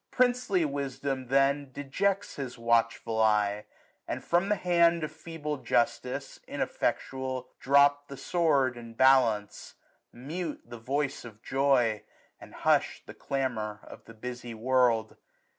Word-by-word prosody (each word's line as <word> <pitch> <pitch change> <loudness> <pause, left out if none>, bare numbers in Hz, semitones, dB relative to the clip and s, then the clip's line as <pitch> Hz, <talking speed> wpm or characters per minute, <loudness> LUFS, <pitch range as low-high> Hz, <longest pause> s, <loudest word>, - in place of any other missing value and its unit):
Princely 245 -8 +2
wisdom, 140 -2 -3
then, 140 +2 +2
1065 130 - -24
Dejects 195 +9 -1
his 130 -4 -5
watchful 115 -1 +1
eye; 105 -1 +2 0.4
and - - -4
from 175 +4 +1
the 210 - +3
hand 170 -3 +3
Of 155 - -3
feeble 150 -3 -5
justice, 130 +2 -1
ineflfectual, 130 -1 -2
drop 145 +1 +4
The 140 - -9
sword 140 -8 +1
and 115 -1 -11
balance: 125 -6 +3 0.4
mute 155 +6 -5
the 120 0 -10
voice 140 +4 -2
of 115 -2 -12
joy. 130 -6 +2 0.4
And - - -13
hush'd - - +1
the - - -10
clamour 110 -6 -3
of - - -13
the 115 - -13
busy 120 +1 -7
world. 120 -2 +1
135 Hz, 130 wpm, -29 LUFS, 120-145 Hz, 0.4 s, drop